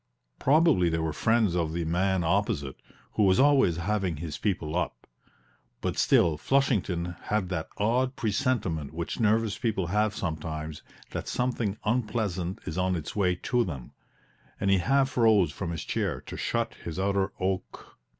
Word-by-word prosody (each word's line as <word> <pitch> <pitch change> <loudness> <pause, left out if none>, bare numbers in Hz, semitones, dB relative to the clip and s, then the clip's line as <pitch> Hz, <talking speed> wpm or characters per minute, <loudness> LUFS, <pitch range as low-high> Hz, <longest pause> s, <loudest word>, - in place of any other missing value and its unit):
Probably 145 - +4
they 80 - 0
were 80 -1 -1
friends 110 -5 +2
of 80 -3 0
the 85 0 -2
man 95 +2 +1
opposite, 85 - -1 0.3
who - - -1
was 95 0 +4
always 135 - +4
having 95 -2 -1
his 75 -1 -5
people 85 -6 -1
up; 75 -9 -2 0.7
but - - -2
still 80 -3 +3
Flushington 95 - +1
had 105 -3 0
that 85 -4 -3
odd 125 +5 +1
presentiment 105 - -1
which 85 0 -4
nervous 110 -1 +2
people 110 -6 0
have 105 +4 +1
sometimes 80 -2 -4 0.3
that - - -4
something 120 -5 -1
unpleasant 105 -6 -1
is 80 +4 -3
on 90 0 +1
its 80 - -5
way 90 -3 +2
to 125 -1 +2
them, 70 - -6 0.7
and 100 0 +1
he 95 - +4
half 135 +6 +1
rose 110 -8 +5
from 85 +4 -5
his 85 -1 -4
chair - - -1
to - - -9
shut - - -1
his 85 -1 -5
outer 100 0 +1
oak. 95 -7 -4
95 Hz, 160 wpm, -28 LUFS, 85-110 Hz, 0.7 s, rose